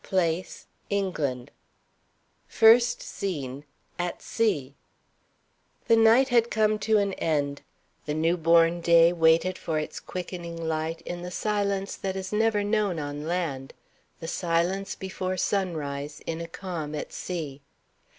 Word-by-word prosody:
Place: 180 -1 -1 0.2
ENGLAND. 155 -11 -2 1.0
FIRST 235 +2 +5
SCENE 145 -7 -5 0.3
At 175 0 -3
Sea. 150 - 0 1.1
The 230 - +5
night 225 +4 +5
had 235 -1 +3
come 215 -1 +2
to 215 +1 +2
an 200 -1 +1
end. 145 -4 -1 0.5
The 150 - -1
new 165 +2 +2
born 165 0 +4
day 170 0 +6
waited 165 +2 +3
for 160 -2 -2
its 155 - -4
quickening 175 -2 -6
light 160 0 -2
in 175 +1 -6
the 180 - -5
silence 200 0 -1
that 190 -1 -3
is 190 +1 -5
never 215 -1 +2
known 205 -4 0
on 145 0 -5
land 160 -7 -3 0.4
the 165 - -6
silence 175 +3 0
before 185 -1 -4
sunrise, 155 -7 -2
in 165 0 -3
a 165 - -5
calm 165 -4 -5
at 150 - -5
sea. 150 -6 -5
175 Hz, 130 wpm, -27 LUFS, 160-195 Hz, 1.1 s, day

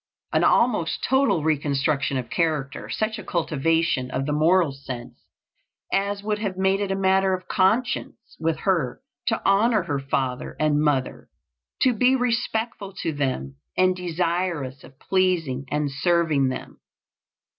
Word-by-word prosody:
An - - +3
almost 210 -9 +2
total 265 - +2
reconstruction 145 -2 0
of 125 -2 -5
character; 155 -5 -1
such 220 0 -2
a - - -7
cultivation 160 -5 0
of 135 - -2
the 150 - -1
moral 165 +1 +3
sense 135 -3 -8 0.7
as 200 +1 0
would 210 0 -1
have 200 -4 -3
made 190 +1 +2
it 200 - -1
a 195 - 0
matter 190 0 +3
of 185 0 -10
conscience 215 +6 +1 0.2
with 160 0 -1
her 165 - 0 0.3
to 225 - +1
"honor 210 +1 +3
her 145 -5 -2
father 135 -1 -2
and 150 -1 +2
mother," 145 -4 -1 0.5
to 255 - +4
be 250 +4 +3
respectful 230 -5 -1
to 165 -2 -1
them 130 - -2 0.2
and 185 0 +4
desirous 170 -5 -2
of 135 - -15
pleasing 170 -8 0
and 150 -1 -1
serving 155 -1 +2
them. 130 - -7
170 Hz, 145 wpm, -24 LUFS, 140-195 Hz, 0.7 s, to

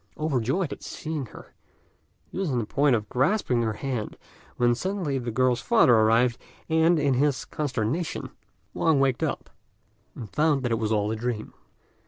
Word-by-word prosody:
Overjoyed 150 - 0
at - - -11
seeing 155 -5 -5
her, - - -14 0.8
he - - -5
was 190 -4 -1
on 125 - 0
the 115 - -1
point 140 +3 +2
of 105 -2 -3
grasping 130 - +1
her 110 -2 0
hand, 120 -2 -4 0.4
when 120 0 +3
suddenly 175 -2 -2
the 120 -1 -4
girl's 125 +1 +1
father 120 - +4
arrived, 115 +2 +3 0.3
and, 160 +1 +3
in 145 -3 +2
his 140 +1 +1
consternation, 140 +3 -3 0.4
Wang 160 -4 +2
waked 135 -2 +1
up, - - -3 0.6
and 115 - -7
found 150 +3 +1
that 120 - -1
it 115 - +1
was 110 -1 -1
all 105 -1 +1
a - - -1
dream. 115 -1 -4
130 Hz, 170 wpm, -26 LUFS, 115-150 Hz, 0.8 s, father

